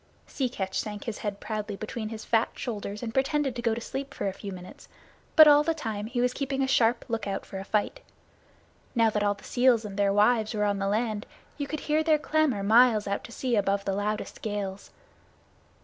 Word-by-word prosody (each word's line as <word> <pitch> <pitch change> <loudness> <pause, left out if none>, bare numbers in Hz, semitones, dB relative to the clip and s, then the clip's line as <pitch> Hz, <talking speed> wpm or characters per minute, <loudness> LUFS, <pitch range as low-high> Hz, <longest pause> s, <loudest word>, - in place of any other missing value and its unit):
Sea 260 -3 -2
Catch 190 -5 -3
sunk 210 -2 -5
his 230 -3 -5
head 205 -2 -4
proudly 215 -2 -4
between 215 +1 -5
his 220 -1 -7
fat 225 0 +2
shoulders 210 -2 -5
and 225 -1 -4
pretended 270 0 +1
to 240 - -4
go 230 -2 +1
to - - -4
sleep 275 +3 -6
for - - -2
a 195 - -2
few 200 0 -7
minutes, 180 -1 -11 0.5
but 310 -1 +10
all 295 0 +7
the 325 +2 0
time 220 -8 -4
he 245 +1 -3
was 250 0 +1
keeping 270 0 -1
a - - +1
sharp 235 -2 +2
lookout 205 -4 -3
for 195 - -7
a - - -5
fight. 210 - -1 1.0
Now 230 -2 +4
that 210 - -1
all 205 0 +2
the 200 - -18
seals 245 -3 +3
and 200 -1 -7
their 200 -1 +3
wives 215 +2 +3
were 210 0 +1
on 200 -1 0
the 195 - -1
land, 215 0 -1 0.3
you 285 - -2
could 310 +1 -4
hear 305 +1 +1
their 315 -1 +3
clamor 300 -8 +1
miles 220 0 +5
out 200 0 -2
to - - -11
sea 245 +1 -1
above 200 -1 +1
the 195 - 0
loudest 210 +2 -3
gales. 200 -2 -4
220 Hz, 220 wpm, -27 LUFS, 205-255 Hz, 1.0 s, but